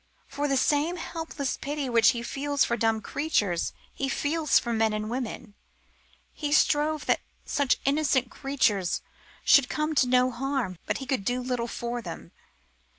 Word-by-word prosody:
For 290 +1 -2
the 275 -1 +1
same 295 +6 +2
helpless 325 -5 -4
pity 285 0 -3
which 230 -3 +5
he 235 -1 -1
feels 285 +3 0
for 235 - 0
dumb 225 -2 +1
creatures 210 - 0 0.2
he 270 - -2
feels 305 +2 +2
for 235 0 0
men 220 -1 +2
and 215 +1 -3
women:... 240 -4 -5 0.8
He 295 -2 -3
strove 300 0 +2
that - - +2 0.2
such 285 -3 +1
innocent 275 -3 +2
creatures 215 -10 0 0.4
should 280 -3 +6
come 305 +1 -1
to 275 -4 +3
no 250 0 +3
harm, 250 -7 -2
But - - 0
he 270 - -6
could 255 -5 -1
do 245 +5 0
little 250 -2 -2
for 240 +1 -4
them. 165 - -8
260 Hz, 160 wpm, -27 LUFS, 235-290 Hz, 0.8 s, should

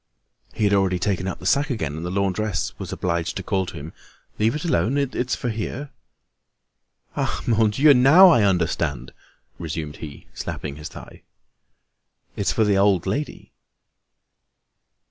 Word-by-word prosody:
He - - -3
had 100 -1 +3
already 95 -2 +2
taken 95 0 -1
up 95 - -3
the 90 - -12
sack 140 +9 +2
again, 90 - -3
and 80 - -6
the 90 - -3
laundress 100 0 -1
was - - -6
obliged 85 -1 -2
to 95 - -5
call 95 0 -1
to 90 - -8
him: 75 +1 -8 0.5
"Leave 110 +4 +2
it 150 - -4
alone, 120 - +1
it's 130 -3 -1
for 125 - -3
here." 120 +6 -5 1.2
"Ah! - - -2
Mon 110 -2 +3
Dieu! 140 +8 +5
Now 145 +9 +7
I 140 -9 +5
understand!" 85 -9 0 0.5
resumed 80 -2 -5
he, 75 -3 -10
slapping 70 -1 -6
his 75 - -7
thigh. - - -12 1.1
"It's 95 -4 0
for 110 - +2
the 100 -2 +2
old 100 -3 +3
lady." 140 +11 -4
100 Hz, 155 wpm, -23 LUFS, 85-115 Hz, 1.2 s, Now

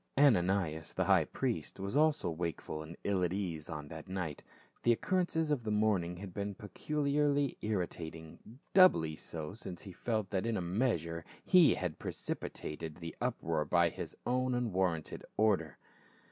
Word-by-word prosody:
Ananias, 95 - +3
the - - +1
high - - +4
priest, - - -3
was 100 +5 -3
also 155 - +3
wakeful 80 -2 -3
and 80 +2 -9
ill 100 -2 +1
at 90 - +1
ease 90 -6 -3
on 75 -2 -5
that 80 -1 -8
night; 90 -6 -4 0.4
the 120 - +4
occurrences 160 +3 +1
of 135 -5 +1
the 110 - -3
morning 105 -5 +1
had 95 -1 -8
been 100 0 -3
peculiarly 145 +6 0
irritating, 85 0 -4 0.2
doubly 85 - +6
so 80 +1 -6
since 95 -5 -7
he 100 - -8
felt 110 0 -2
that 95 +2 0
in 115 -2 0
a - - 0
measure 85 -4 0 0.2
he 180 -4 +7
had 90 -4 -3
precipitated 75 0 -5
the 85 -1 -7
uproar 85 -11 0
by 85 +2 +3
his - - -7
own 125 +1 +1
unwarranted 95 -9 -1
order. 95 - +2
95 Hz, 155 wpm, -33 LUFS, 85-120 Hz, 0.4 s, he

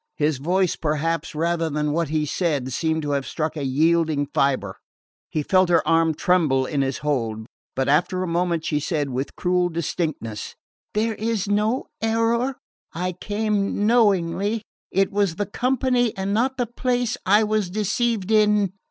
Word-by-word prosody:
His 150 -2 0
voice, 180 +4 +1
perhaps, 155 +1 -2
rather 165 +1 0
than 150 0 -1
what 165 0 0
he 155 -1 0
said, 145 -6 -1
seemed 160 +3 0
to 145 - -2
have 140 -1 -1
struck 155 -1 -2
a 150 - -3
yielding 155 +2 +2
fibre. 130 -9 0 0.5
He 155 - -1
felt 185 +2 +3
her 165 -3 +3
arm 165 -1 +3
tremble 150 -8 +2
in 140 +1 -1
his 135 -1 -1
hold; 115 -7 -1 0.3
but 135 - 0
after 175 +5 +2
a - - -3
moment 170 -1 0
she 150 - 0
said 150 -3 -2
with 130 +2 -3
cruel 180 0 +1
distinctness: 155 -9 -3 0.4
"There 220 +1 +1
was 220 -3 -1
no 210 +5 +1 0.2
error. 230 +3 +1 0.4
I 180 +2 -2
came 205 +2 -1
knowingly. 205 -1 +2 0.3
It 195 +1 +1
was 200 -4 +1
the 205 - -1
company 250 0 0
and 195 +1 -1
not 260 +5 +1
the 245 - +1
place 245 0 -1
I 205 +3 +4
was 215 -3 0
deceived 215 +1 -1
in." 210 -3 +3
175 Hz, 160 wpm, -23 LUFS, 150-210 Hz, 0.5 s, I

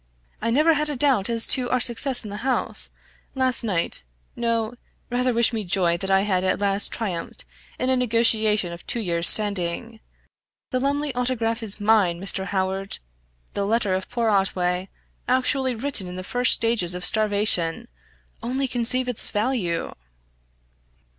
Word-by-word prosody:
"I 230 - -1
never 305 +7 +3
had 300 0 0
a 295 - -3
doubt 255 -6 +1
as 230 -1 +2
to 250 -2 +2
our 255 - +1
success 245 +2 -1
in 210 - -8
the 205 - -6
house, 255 +3 -3 0.5
last 260 -2 +2
night 180 - +2 0.3
no; 230 -1 -2 0.4
rather 250 +1 0
wish 235 0 +2
me 220 -2 -2
joy 175 -2 0
that 195 +2 -4
I 195 0 +3
have 190 -3 -1
at 185 - 0
last 200 0 +2
triumphed 185 -7 -5 0.3
in 255 +1 -1
a - - +3
negotiation 220 -6 +1
of 170 - -11
two 235 - -2
years 170 -5 +5
standing. 210 +2 +4 0.7
The 255 - 0
Lumley 285 +1 -1
Autograph 240 -2 -1
is 215 -2 -2
mine, 205 -5 +2
Mr. 195 0 -1
Howard! 190 0 -3 0.6
The 200 - -2
letter 205 -1 0
of 185 0 -3
poor 235 -2 -1
Otway, 185 -2 -1 0.4
actually 260 0 +1
written 230 -5 -3
in 180 - -8
the 185 - -6
first 245 +5 +3
stages 220 -7 0
of 180 0 -5
starvation 205 -6 +2 0.5
only 265 +3 -2
conceive 250 +1 0
its 250 -3 -4
value!" 210 -6 -2
220 Hz, 160 wpm, -23 LUFS, 190-250 Hz, 0.7 s, years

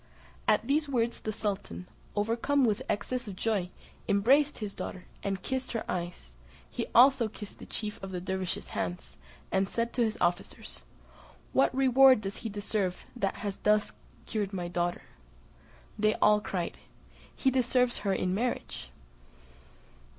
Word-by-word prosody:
At - - +3
these 295 +1 +2
words 240 -3 0
the 215 - -3
sultan, 200 -3 -3 0.3
overcome 235 +6 +2
with 215 -3 +1
excess 245 +4 -1
of 200 - -6
joy, 200 -3 0 0.4
embraced 275 +9 +4
his 210 -3 -4
daughter, 185 - -6 0.2
and 195 -2 -2
kissed 260 -1 -2
her 230 - -2
eyes; 175 - -4 0.3
he 235 - -4
also 255 -1 +7
kissed 210 -1 -9
the - - -10
chief 210 -1 -5
of 195 - -5
the 185 -1 -3
dervises' 185 0 -3
hands, 175 0 -4 0.4
and 190 0 +2
said 235 0 -1
to 245 - +2
his 220 0 0
officers, 175 0 -2 0.7
"What 265 -1 +3
reward 265 -2 +6
does 200 0 -4
he 225 - -4
deserve 200 -2 -2
that 200 -5 -1
has 200 -3 -4
thus 210 0 +2 0.3
cured 210 -3 -2
my 180 -2 -2
daughter?" 175 0 -1 1.0
They 215 +1 +3
all 210 0 +4
cried, 180 -4 -3 0.6
"He 265 - +2
deserves 250 -1 +2
her 200 -1 0
in 185 -1 0
marriage." 215 - -2
210 Hz, 150 wpm, -30 LUFS, 190-245 Hz, 1.0 s, also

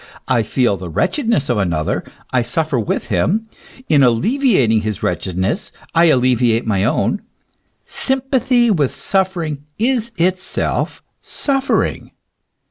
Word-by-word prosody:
I 120 -3 +2
feel 110 -1 +1
the 90 -1 -7
wretchedness 190 - 0
of 120 -4 +1
another, 85 -5 -1 0.3
I 125 - +2
suffer 140 +3 -1
with 110 - -2
him; 175 - +1 0.4
in 145 -2 +4
alleviating 130 - +3
his 105 -2 -4
wretchedness 95 - -2 0.2
I 170 +1 +5
alleviate 125 -5 +3
my 100 -4 +1
own; 165 - 0 0.6
sympathy 260 -3 +1
with 150 -9 +1
suffering 175 -7 -1
is 235 0 0
itself 185 +2 -1 0.2
suffering. 270 -2 -1
145 Hz, 115 wpm, -18 LUFS, -, 0.6 s, I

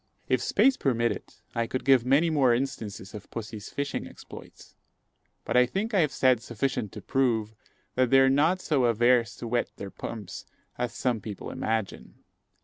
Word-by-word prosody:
If - - +1
space 270 -1 +3
permitted, 120 -3 -1 0.2
I 115 0 -1
could 130 - -4
give 135 -3 +5
many 150 +5 +4
more 130 -6 +4
instances 115 -7 -4
of 105 -2 -9
pussy's 110 -2 -7
fishing 140 -1 -3
exploits; - - -13 0.7
but - - -2
I 125 0 +6
think 205 - -3
I 200 - +4
have 155 -4 +2
said 130 -3 +3
sufficient 120 -2 -2
to - - -9
prove, 115 -5 0 0.4
that 130 -1 +2
they 135 - +6
are 135 - +6
not 155 +7 +3
so 140 -6 +1
averse 120 0 +3
to 120 - -7
wet 120 +1 0
their 100 -1 -7
pumps 105 -5 -7 0.3
as 125 -1 -3
some 120 -4 -1
people 105 -1 -7
imagine. 110 -3 -3
125 Hz, 170 wpm, -27 LUFS, 115-135 Hz, 0.7 s, I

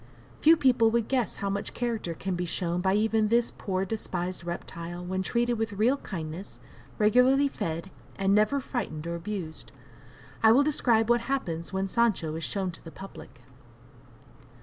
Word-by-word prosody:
Few 325 +2 +6
people 245 -5 +4
would 230 -1 +1
guess 255 -4 0
how 200 - -3
much 200 0 -4
character 230 -8 -2
can 190 +3 -3
be 175 0 -2
shown 175 0 -1
by 190 +1 +2
even 220 0 +2
this 235 +2 +2
poor, 190 -1 -2
despised 185 -4 -3
reptile 175 0 -6
when 185 +1 -1
treated 240 +3 0
with 225 -2 -1
real 230 +7 +2
kindness, 170 - -7 0.4
regularly 250 +6 +5
fed, 170 -6 -4 0.2
and 195 0 +2
never 215 +7 +3
frightened 200 - -4
or 170 - -3
abused. 170 -2 -6 0.7
I 220 0 +7
will 275 +4 +5
describe 235 -7 +2
what 240 0 +3
happens 205 -11 -3
when 190 0 -1
Sancho 205 -7 +1
is 160 +1 -5
"shown 190 0 -2
to 170 - -13
the 165 - -9
public." 195 +4 -11
200 Hz, 165 wpm, -28 LUFS, 175-235 Hz, 0.7 s, I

